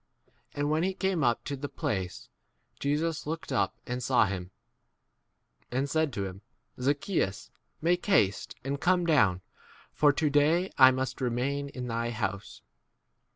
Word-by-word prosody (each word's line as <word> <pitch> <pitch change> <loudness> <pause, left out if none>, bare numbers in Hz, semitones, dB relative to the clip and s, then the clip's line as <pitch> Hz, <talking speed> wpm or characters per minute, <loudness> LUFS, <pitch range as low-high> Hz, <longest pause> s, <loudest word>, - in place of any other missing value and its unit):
And 145 +1 0
when 155 +1 +2
he 190 +2 0
came 190 -5 0
up 120 -1 +2
to 145 - -4
the 140 +1 -5
place, 90 - -3 0.5
Jesus 150 +2 -1
looked 160 -1 -4
up 130 - +1
and 125 0 -3
saw 125 -2 +3
him, 95 -2 -4 1.2
and 130 +3 0
said 160 0 +1
to 100 -2 -2
him, 95 +1 -8 0.4
Zacchaeus, 135 - -1 0.3
make 175 +2 +2
haste 105 - +2
and 140 +1 -3
come 180 0 +3
down, 105 - +3 0.5
for 145 -1 +5
to 145 +1 0
day 160 +6 +3
I 130 -1 +9
must 130 +1 -2
remain 130 +3 -1
8 140 - -13
in 125 -1 -4
thy 115 0 -1
house. 100 -3 -4
140 Hz, 155 wpm, -29 LUFS, 115-155 Hz, 1.2 s, I